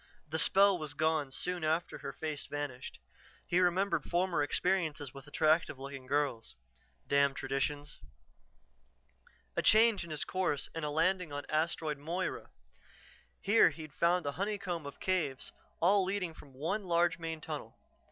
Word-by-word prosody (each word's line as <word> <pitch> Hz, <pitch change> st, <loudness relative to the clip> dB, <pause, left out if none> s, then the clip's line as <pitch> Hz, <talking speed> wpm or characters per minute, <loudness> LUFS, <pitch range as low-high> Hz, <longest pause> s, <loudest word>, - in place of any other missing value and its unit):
The 160 Hz, +2 st, -1 dB
spell 195 Hz, 0 st, +5 dB
was 150 Hz, -2 st, -5 dB
gone 155 Hz, -2 st, +1 dB
soon 180 Hz, +4 st, -3 dB
after 160 Hz, +2 st, 0 dB
her -, -, -5 dB
face 155 Hz, -2 st, -5 dB
vanished; 145 Hz, -4 st, -5 dB, 0.5 s
he 175 Hz, -, +2 dB
remembered 185 Hz, +2 st, +2 dB
former 175 Hz, -2 st, +1 dB
experiences 155 Hz, -3 st, 0 dB
with 135 Hz, 0 st, -11 dB
attractive 155 Hz, 0 st, +2 dB
looking 135 Hz, -1 st, -8 dB
girls. 140 Hz, -4 st, -1 dB, 0.5 s
Damn 140 Hz, -1 st, +3 dB
traditions! 135 Hz, +2 st, -2 dB, 1.6 s
A -, -, +1 dB
change 220 Hz, -2 st, +5 dB
in 170 Hz, -, -9 dB
his 155 Hz, -2 st, -2 dB
course 185 Hz, -6 st, -1 dB
and 165 Hz, -, -4 dB
a 150 Hz, -, -1 dB
landing 170 Hz, +2 st, +1 dB
on 145 Hz, 0 st, -5 dB
Asteroid 155 Hz, -1 st, 0 dB
Moira. 170 Hz, +5 st, -3 dB, 0.9 s
Here 205 Hz, +3 st, +6 dB
he'd 155 Hz, -3 st, -9 dB
found 175 Hz, 0 st, +2 dB
a 145 Hz, -, 0 dB
honeycomb 200 Hz, -6 st, -2 dB
of 140 Hz, -, -10 dB
caves, 160 Hz, -8 st, -1 dB, 0.3 s
all 195 Hz, +3 st, +4 dB
leading 185 Hz, -3 st, -2 dB
from 140 Hz, -3 st, -15 dB
one 190 Hz, +9 st, -2 dB
large 170 Hz, -1 st, +2 dB
main 165 Hz, -1 st, -4 dB
tunnel. 150 Hz, -8 st, -7 dB
160 Hz, 145 wpm, -33 LUFS, 145-180 Hz, 1.6 s, Here